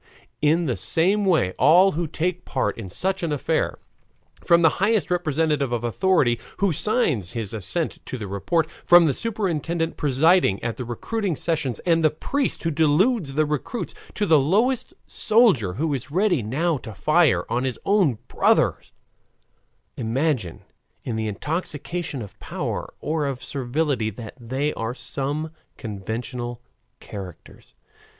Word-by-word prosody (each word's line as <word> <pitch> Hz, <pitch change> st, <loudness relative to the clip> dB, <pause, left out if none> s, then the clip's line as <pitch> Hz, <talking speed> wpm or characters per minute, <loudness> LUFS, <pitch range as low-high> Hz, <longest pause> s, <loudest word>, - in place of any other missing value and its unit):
In 160 Hz, +3 st, +3 dB
the 125 Hz, -, 0 dB
same 185 Hz, -, +2 dB
way 160 Hz, -, +3 dB
all 180 Hz, +6 st, +6 dB
who 165 Hz, +2 st, -2 dB
take 180 Hz, +4 st, -2 dB
part 130 Hz, -, -1 dB
in 105 Hz, -5 st, -7 dB
such 190 Hz, -, -1 dB
an 170 Hz, -3 st, -1 dB
affair, 145 Hz, -, 0 dB, 0.7 s
from 170 Hz, 0 st, +4 dB
the 160 Hz, -, +4 dB
highest 210 Hz, -2 st, +2 dB
representative 155 Hz, -5 st, +1 dB
of 120 Hz, -1 st, -1 dB
authority 120 Hz, -, +2 dB, 0.2 s
who 195 Hz, -4 st, +2 dB
signs 155 Hz, -, 0 dB
his 115 Hz, -4 st, -3 dB
assent 115 Hz, -, -2 dB
to 130 Hz, -, -4 dB
the 110 Hz, -, -5 dB
report, 100 Hz, -, 0 dB, 0.2 s
from 175 Hz, -1 st, +7 dB
the 145 Hz, -, +2 dB
superintendent 170 Hz, -6 st, -2 dB
presiding 150 Hz, -, +3 dB
at 115 Hz, -1 st, -3 dB
the 125 Hz, -, -4 dB
recruiting 190 Hz, -, -2 dB
sessions, 145 Hz, -8 st, -1 dB
and 165 Hz, -2 st, +3 dB
the 155 Hz, -, +6 dB
priest 270 Hz, -, -2 dB
who 165 Hz, -, 0 dB
deludes 160 Hz, -, +2 dB
the 155 Hz, +1 st, +3 dB
recruits, 150 Hz, -, -3 dB, 0.2 s
to 210 Hz, -, 0 dB
the 160 Hz, -5 st, +5 dB
lowest 220 Hz, -, +1 dB
soldier 200 Hz, -, +3 dB
who 155 Hz, +5 st, -1 dB
is 135 Hz, +1 st, -4 dB
ready 180 Hz, -, +2 dB
now 145 Hz, +8 st, 0 dB
to 110 Hz, -5 st, -9 dB
fire 155 Hz, -, +3 dB
on 125 Hz, +1 st, -1 dB
his 130 Hz, -2 st, -2 dB
own 190 Hz, -, +3 dB
brothers, -, -, +1 dB, 1.1 s
imagine, 120 Hz, -, -1 dB, 0.4 s
in 120 Hz, -, -3 dB
the 110 Hz, 0 st, -2 dB
intoxication 150 Hz, -, -3 dB
of 100 Hz, -, -13 dB
power -, -, -4 dB
or 150 Hz, -1 st, -1 dB
of 135 Hz, -2 st, -4 dB
servility, 135 Hz, -3 st, -1 dB
that 110 Hz, +1 st, -9 dB
they 130 Hz, +5 st, -2 dB
are 115 Hz, +2 st, -4 dB
some 145 Hz, +4 st, -3 dB, 0.3 s
conventional 115 Hz, +3 st, -5 dB, 0.4 s
characters. 95 Hz, -5 st, -11 dB
150 Hz, 145 wpm, -23 LUFS, 120-175 Hz, 1.1 s, from